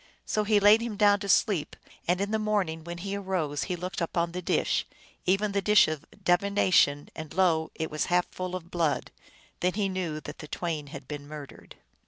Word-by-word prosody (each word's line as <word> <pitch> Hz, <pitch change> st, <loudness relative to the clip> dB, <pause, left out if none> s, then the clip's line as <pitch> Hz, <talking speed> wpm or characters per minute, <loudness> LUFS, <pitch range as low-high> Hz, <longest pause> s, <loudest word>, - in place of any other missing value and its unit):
So 215 Hz, 0 st, 0 dB
he 210 Hz, 0 st, +4 dB
laid 205 Hz, +2 st, +6 dB
him 230 Hz, -3 st, -4 dB
down 205 Hz, 0 st, +5 dB
to 200 Hz, -1 st, -5 dB
sleep, 190 Hz, -6 st, +2 dB, 0.3 s
and 180 Hz, +2 st, +2 dB
in 200 Hz, +1 st, -1 dB
the 220 Hz, -, +1 dB
morning 195 Hz, -7 st, -1 dB
when 170 Hz, +1 st, -6 dB
he 195 Hz, +3 st, -4 dB
arose 185 Hz, -7 st, -2 dB
he 180 Hz, -, -2 dB
looked 180 Hz, +1 st, -5 dB
upon 170 Hz, 0 st, 0 dB
the 180 Hz, +1 st, -4 dB
dish, -, -, 0 dB, 0.4 s
even 200 Hz, +3 st, +2 dB
the 200 Hz, 0 st, 0 dB
dish 210 Hz, +2 st, +6 dB
of 155 Hz, 0 st, -4 dB, 0.2 s
divination, 180 Hz, -5 st, +3 dB
and 155 Hz, -1 st, -7 dB
lo! 165 Hz, -4 st, +3 dB
it 160 Hz, -1 st, -3 dB
was 155 Hz, -, 0 dB
half 180 Hz, 0 st, +2 dB
full 185 Hz, 0 st, -4 dB
of 175 Hz, -1 st, -8 dB
blood. 165 Hz, -4 st, 0 dB, 0.5 s
Then 180 Hz, 0 st, +1 dB
he 200 Hz, -1 st, 0 dB
knew 180 Hz, -5 st, -3 dB
that 145 Hz, -, -9 dB
the 150 Hz, -, -8 dB
twain 155 Hz, -3 st, -3 dB
had 140 Hz, -1 st, -9 dB
been 145 Hz, -1 st, -7 dB
murdered. 150 Hz, -2 st, -10 dB
180 Hz, 205 wpm, -28 LUFS, 160-200 Hz, 0.5 s, laid